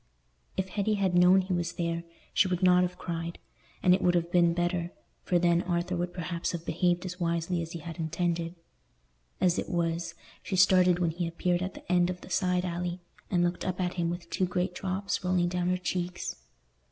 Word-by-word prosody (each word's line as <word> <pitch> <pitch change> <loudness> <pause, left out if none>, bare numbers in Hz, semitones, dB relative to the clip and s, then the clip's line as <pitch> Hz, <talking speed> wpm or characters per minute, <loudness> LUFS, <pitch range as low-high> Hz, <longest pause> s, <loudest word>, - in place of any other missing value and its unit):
If 190 0 -1
Hetty 210 +3 0
had 195 -3 +1
known 180 +2 +6
he 185 0 -3
was 175 0 -1
there, 170 -1 -2 0.3
she 195 - +4
would 180 0 -1
not 180 0 +6
have 180 0 -1
cried; 170 -1 -4 0.5
and 180 - +6
it 190 - +2
would 175 0 +3
have 170 0 0
been 170 -1 +4
better, 175 0 0 0.3
for 180 - +1
then 170 0 +3
Arthur 175 0 -1
would 175 0 -2
perhaps 170 -1 -3
have 170 -1 -5
behaved 175 +2 +1
as 180 0 -6
wisely 170 0 0
as 165 0 -6
he 170 - -5
had 165 +2 -8
intended. 165 +1 -1 0.8
As 180 -1 +3
it - - -4
was, 170 0 -1 0.3
she 195 - -3
started 185 -1 +5
when 175 -2 +1
he 170 +1 -2
appeared 175 +1 0
at 185 +1 -3
the - - -8
end 175 0 +4
of 180 0 -4
the - - -12
side 180 -1 +1
alley, 175 0 -3 0.3
and 175 -2 +2
looked 175 0 -1
up 185 0 -2
at 180 -1 0
him 170 -2 -1
with 175 0 -5
two 185 - +1
great 180 0 -1
drops 190 +1 -2
rolling 180 -1 +2
down 180 0 0
her 185 - +2
cheeks. 180 -1 -3
175 Hz, 210 wpm, -29 LUFS, 170-180 Hz, 0.8 s, known